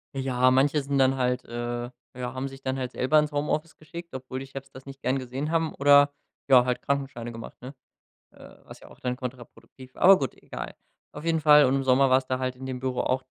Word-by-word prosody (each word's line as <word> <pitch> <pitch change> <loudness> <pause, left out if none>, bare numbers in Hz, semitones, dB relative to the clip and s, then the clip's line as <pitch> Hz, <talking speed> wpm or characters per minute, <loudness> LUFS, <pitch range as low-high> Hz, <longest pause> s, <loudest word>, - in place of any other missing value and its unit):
Ja. 130 -1 +2
Manche 140 +3 +3
sind 140 0 -2
dann 135 0 +3
halt 125 0 0
äh, 120 0 -4 0.3
ja, 125 -1 -5
haben 130 +1 -4
sich 135 0 -11
dann 130 0 -2
halt 130 -1 -4
selber 140 +5 +3
ins 150 0 -1
Homeoffice 150 +1 -2
geschickt, 170 +2 -10
obwohl 130 0 -6
die 135 - -8
Chefs 135 0 -10
das 130 - -13
nicht 135 -1 -11
gern 130 +2 0
gesehen 135 +5 -4
haben, 165 -1 0
oder, 145 0 +5 0.4
ja, 125 -2 +7
halt 125 -1 -1
Krankenscheine 135 -4 -3
gemacht, 115 0 -9
ne, 130 +3 -9 0.6
äh, - - -15
was - - -13
ja - - -14
auch - - -17
dann 125 -1 -2
kontraproduktiv 125 0 -10
war, - - -11
aber 190 +1 +8
gut, 135 -3 -3
egal. - - -7 0.4
Auf 150 - -9
jeden 165 -1 +1
Fall 150 -1 +7
und 130 +2 +2
im 135 - -1
Sommer 130 +1 +4
war's 130 0 +3
da 130 - -1
halt 130 0 -2
in 130 - -8
dem 130 -1 -5
Büro 130 -1 -2
auch 130 +1 0
130 Hz, 235 wpm, -26 LUFS, 125-140 Hz, 0.6 s, aber